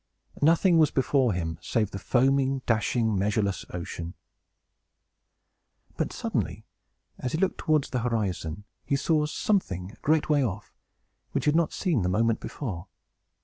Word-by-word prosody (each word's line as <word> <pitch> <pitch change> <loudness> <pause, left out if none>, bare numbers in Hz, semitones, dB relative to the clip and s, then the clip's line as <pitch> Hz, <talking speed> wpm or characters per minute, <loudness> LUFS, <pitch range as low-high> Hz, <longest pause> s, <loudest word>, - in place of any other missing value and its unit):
Nothing 165 +3 +5
was 155 -2 +5
before 135 -2 +2
him, 80 -2 -3
save 105 0 0
the 95 - -5
foaming, 135 +4 +2
dashing, 110 0 +1
measureless 100 -1 0
ocean. 85 -1 -6 1.8
But, - - -1
suddenly, 90 +8 -3 0.5
as 125 - -3
he - - +1
looked 190 +2 0
towards 155 -3 +1
the 125 - 0
horizon, 105 -6 -2 0.2
he 140 - 0
saw 150 +1 +2
something, 100 - -1
a - - -19
great 155 0 +2
way 145 -2 +3
off, 105 -3 -4 0.6
which - - -1
he - - +5
had 150 - +2
not 165 -1 +2
seen 170 - 0
the 90 - 0
moment 115 +4 +2
before. 95 - -5
120 Hz, 145 wpm, -27 LUFS, 95-150 Hz, 1.8 s, Nothing